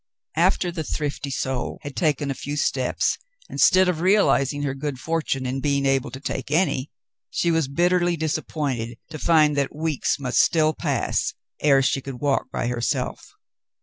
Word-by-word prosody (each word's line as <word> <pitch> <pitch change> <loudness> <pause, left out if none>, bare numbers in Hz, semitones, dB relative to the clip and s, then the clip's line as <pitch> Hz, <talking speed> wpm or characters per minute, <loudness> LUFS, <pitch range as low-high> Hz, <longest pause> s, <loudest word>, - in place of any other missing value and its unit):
After 175 +1 +2
the 165 -2 -4
thrifty 145 -1 -3
soul 130 -2 -2
had 145 -1 -7
taken 145 -3 +1
a - - 0
few 145 +2 -5
steps, 130 -3 0 0.3
instead 185 0 +5
of 180 -3 0
realizing 150 -7 +3
her 140 -2 -1
good 135 -1 -4
fortune 155 -4 -1
in 130 +1 -2
being 140 0 0
able 135 -1 +1
to 130 - -8
take 135 -1 -4
any, 150 -4 +1 0.4
she 170 - +1
was 160 -4 +1
bitterly 175 +3 +2
disappointed 145 -6 -2
to 155 - -6
find 155 -3 +4
that 140 0 0
weeks 155 -2 0
must 130 -3 0
still 155 -2 +4
pass - - -1 0.2
ere 140 -2 +4
she 135 +1 +1
could 130 -2 -7
walk 145 -2 0
by - - -2
herself. 120 0 -2
145 Hz, 165 wpm, -24 LUFS, 135-160 Hz, 0.4 s, instead